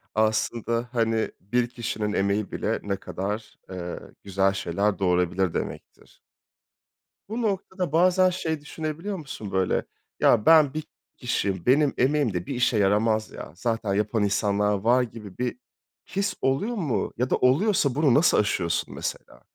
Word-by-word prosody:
Aslında, 115 +2 0
hani, 115 -2 0
bir 120 +5 0
kişinin 110 -3 -3
emeği 100 +1 0
bile - - -1
ne 100 -1 -1
kadar, 105 +3 -5
eee, 90 -2 -5 0.2
güzel 95 0 +1
şeyler 95 +1 -1
doğurabilir 90 -1 +1
demektir. - - -7 1.1
Bu 225 +3 -3
noktada 190 -5 -2
bazen 185 +3 +4
şey 160 -4 -3
düşünebiliyor 160 +6 -5
musun, 135 - -7
böyle? 95 -1 +1 0.3
Ya, 110 -3 +4
ben 155 -4 +6
bir 155 0 -3 0.3
kişiyim, 100 -7 -1
benim 140 +3 +4
emeğim 135 -3 +2
de 90 -1 -3
bir 135 - -4
işe 125 -1 +2
yaramaz 105 +2 +2
ya, - - -9
zaten 115 0 -1
yapan 105 +1 0
insanlar 105 0 +1
var 120 +6 +3
gibi 110 -5 -9
bir 125 - -2 0.6
his 200 0 0
oluyor 140 - 0
mu 160 - -1
ya 125 +2 0
da - - +3
oluyorsa 140 - +2
bunu 145 -3 +3
nasıl 155 +7 +4
aşıyorsun, 90 -5 0
mesela? - - -6
115 Hz, 145 wpm, -25 LUFS, 100-145 Hz, 1.1 s, ben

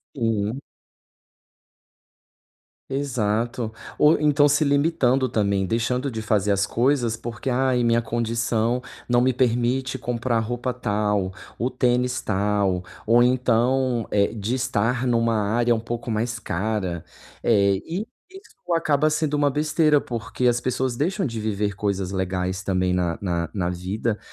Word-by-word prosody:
Uhum. 115 0 -1 2.3
Exato, 120 -4 -1 0.2
ou 150 +1 +5
então 145 -1 +4
se 145 +2 +3
limitando 140 -3 +2
também, 100 -3 +1
deixando 125 +6 -1
de 110 -1 -4
fazer 105 -2 +1
as 100 0 +1
coisas, 120 -2 +1
porque 115 +3 -5
"Ai 130 0 +2
minha 115 0 +3
condição 115 +1 0 0.3
não 120 0 +3
me 130 +1 +3
permite 125 +2 0
comprar 120 -2 -1
roupa 120 +3 -2
tal, 105 -5 -1 0.3
o 125 +3 0
tênis 125 0 +1
tal" 100 -2 0 0.2
ou 120 +1 +6
então, 125 0 +2
eh, 100 +2 +2
de 110 +3 -2
estar 125 0 0
numa 115 -1 +2 0.2
área 120 +1 +2
um 110 - 0
pouco 115 0 -5
mais 115 +2 -1
cara, 95 -4 -2 0.4
eh, 100 -4 +3
e 185 +7 -3 0.2
isso 245 - -7
acaba 155 -2 +2
sendo 155 -1 0
uma 145 -1 +3
besteira, 150 +1 +2
porque 120 +1 -4
as 120 0 +3
pessoas 130 -1 -1
deixam 190 +6 0
de 115 -4 -3
viver 105 -1 -1
coisas 100 -3 -2
legais 95 0 -2
também 90 -1 0
na 90 -2 0
na 85 -3 -1
na 90 -4 -1
vida, 100 +5 -2
120 Hz, 140 wpm, -23 LUFS, 105-130 Hz, 2.3 s, ou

